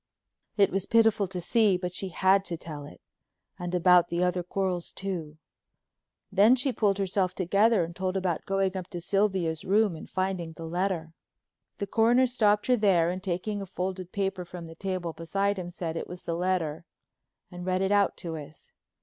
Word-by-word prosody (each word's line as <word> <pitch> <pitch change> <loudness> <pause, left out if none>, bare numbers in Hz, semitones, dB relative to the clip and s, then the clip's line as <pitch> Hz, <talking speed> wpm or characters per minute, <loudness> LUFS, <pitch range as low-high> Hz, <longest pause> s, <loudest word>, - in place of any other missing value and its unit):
It 200 -2 +4
was 195 0 -1
pitiful 225 -3 +3
to 180 0 -5
see 205 +1 +3
but 180 -1 -4
she 190 +1 -1
had 190 +2 +3
to 170 - -4
tell 150 -3 -8
it, - - -14 0.6
and 180 0 -3
about 180 0 +5
the 175 +1 0
other 180 0 +1
quarrels 180 -1 -2
too. 170 -6 -5 0.9
Then 205 +6 +6
she 260 +1 +1
pulled 200 -4 +1
herself 190 -1 0
together 200 +3 +3
and 170 +1 -6
told 185 +1 -1
about 185 -3 -2
going 195 -1 0
up 185 -2 -4
to 175 - -6
Sylvia's 185 -4 0
room 205 -2 +2
and 155 - -10
finding 185 -3 -2
the 165 +1 -8
letter. 170 -1 -2 0.6
The 200 - -2
Coroner 235 +5 +4
stopped 210 -4 +2
her 250 - +4
there 185 -7 +3
and 185 +1 -5
taking 195 +3 -3
a 195 - -6
folded 185 0 -4
paper 195 -2 -2
from 175 -1 -9
the 165 - -10
table 180 -1 -3
beside 195 +5 -1
him 175 -1 -5
said 170 -2 -5
it - - -4
was 180 0 -9
the 170 - -3
letter 170 -3 -1 0.7
and 175 0 -8
read 185 +1 0
it 190 - 0
out 205 -1 +3
to 165 -1 -3
us. 150 0 -11
185 Hz, 190 wpm, -28 LUFS, 175-200 Hz, 0.9 s, Then